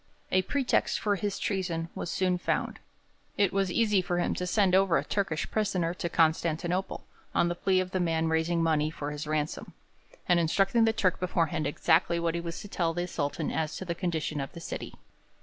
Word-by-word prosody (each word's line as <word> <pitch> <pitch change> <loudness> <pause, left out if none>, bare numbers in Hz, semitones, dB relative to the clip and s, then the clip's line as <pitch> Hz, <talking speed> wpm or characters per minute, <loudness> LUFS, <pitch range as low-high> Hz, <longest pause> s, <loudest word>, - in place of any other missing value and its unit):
A 185 - +4
pretext 265 +7 +1
for 205 -1 +1
his 200 +1 -2
treason 175 -5 -2
was - - -5
soon 180 0 +1
found: - - -1 0.6
it 200 -2 +2
was 195 -2 +1
easy 210 -2 +3
for 180 -1 -2
him 175 - +1
to 180 - -3
send 190 -1 +2
over 190 -2 +4
a - - 0
Turkish 190 -7 -2
prisoner 185 -6 0
to 175 -1 -3
Constantinople, 170 +3 0 0.3
on 170 - +3
the - - 0
plea 185 +2 +1
of 185 0 -2
the 185 - 0
man 165 -2 +1
raising 160 +1 +1
money 155 -2 +2
for 145 -2 -5
his 150 +1 -5
ransom, 155 0 -2 0.5
and 175 -1 +4
instructing 195 +7 +3
the 225 - +4
Turk 185 -5 +1
beforehand 165 -3 0
exactly 170 +3 +2
what 170 -1 0
he 170 - -2
was 170 -1 -5
to - - -8
tell 170 -4 -1
the 175 0 -1
Sultan 145 -2 -2
as 155 -1 -2
to 190 - -6
the 170 - -2
condition 160 -4 -2
of 135 - -6
the 170 - -8
city. - - -6
175 Hz, 200 wpm, -29 LUFS, 160-190 Hz, 0.6 s, A